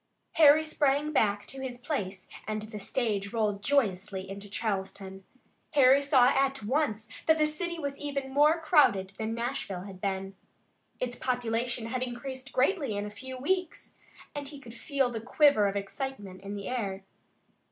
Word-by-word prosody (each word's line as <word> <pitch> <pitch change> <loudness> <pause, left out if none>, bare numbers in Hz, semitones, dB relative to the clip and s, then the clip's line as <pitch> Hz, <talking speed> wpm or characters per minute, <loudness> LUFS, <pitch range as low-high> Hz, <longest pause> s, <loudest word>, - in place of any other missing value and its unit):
Harry 310 0 +7
sprang 295 -1 +1
back 205 -7 +2
to 270 +1 -7
his 255 -2 -4
place 195 - -4 0.2
and 215 0 -2
the 215 -1 -7
stage 205 -2 -1
rolled 210 -3 0
joyously 195 -7 0
into 200 +1 -8
Charleston. 195 -2 -4 0.5
Harry 275 -1 +6
saw 265 -3 +5
at 270 -2 +1
once 220 -3 0 0.2
that 320 0 +5
the 305 - +4
city 340 +3 -2
was 280 -3 -4
even 275 -2 -4
more 300 +4 +5
crowded 290 - +3
than 220 +1 -2
Nashville 235 -6 -3
had 190 -2 -10
been. 195 0 -2 0.6
Its 245 -1 -3
population 240 -1 -1
had 250 +2 -3
increased 260 +2 -5
greatly 270 - +1
in 205 - -2
a 210 - -6
few 260 +5 -8
weeks, 360 +6 -2 0.4
and 290 -1 -5
he 285 0 -8
could 235 -4 -12
feel 270 -1 0
the 225 -2 -4
quiver 250 -3 +4
of 200 - -2
excitement 200 -2 -5
in 200 +1 -6
the 200 -1 -6
air. 200 -6 -3
245 Hz, 165 wpm, -29 LUFS, 205-280 Hz, 0.6 s, Harry